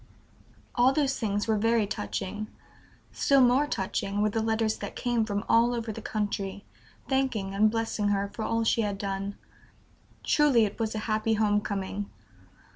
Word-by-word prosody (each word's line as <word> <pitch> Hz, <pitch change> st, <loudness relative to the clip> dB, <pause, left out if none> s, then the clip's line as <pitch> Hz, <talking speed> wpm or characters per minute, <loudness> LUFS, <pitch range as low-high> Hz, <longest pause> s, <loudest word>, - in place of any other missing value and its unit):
All 250 Hz, +2 st, +4 dB
these 280 Hz, -3 st, 0 dB
things 205 Hz, -2 st, -1 dB
were 220 Hz, -2 st, +2 dB
very 225 Hz, 0 st, +2 dB
touching; 190 Hz, -, -4 dB, 0.6 s
still 275 Hz, -1 st, +3 dB
more 260 Hz, +3 st, +4 dB
touching 200 Hz, -3 st, -2 dB
were 215 Hz, -, +2 dB
the 225 Hz, -, 0 dB
letters 220 Hz, 0 st, 0 dB
that -, -, -7 dB
came 240 Hz, -2 st, 0 dB
from 205 Hz, -1 st, -2 dB
all 235 Hz, +1 st, +4 dB
over 230 Hz, -1 st, -3 dB
the 225 Hz, -, -7 dB
country, 205 Hz, -2 st, -3 dB, 0.4 s
thanking 260 Hz, -8 st, 0 dB
and 215 Hz, +2 st, +4 dB
blessing 225 Hz, -2 st, -1 dB
her 200 Hz, 0 st, +1 dB
for 220 Hz, -, -6 dB
all 230 Hz, +1 st, 0 dB
she 225 Hz, +1 st, +2 dB
had 205 Hz, -2 st, -2 dB
done. 195 Hz, 0 st, -3 dB, 0.9 s
Truly 280 Hz, -7 st, +4 dB
it 205 Hz, -, -6 dB
was 220 Hz, -1 st, -1 dB
a 215 Hz, -, -3 dB
happy 220 Hz, 0 st, +1 dB
home 210 Hz, -1 st, +2 dB
coming. 200 Hz, 0 st, -4 dB
215 Hz, 165 wpm, -28 LUFS, 205-230 Hz, 0.9 s, All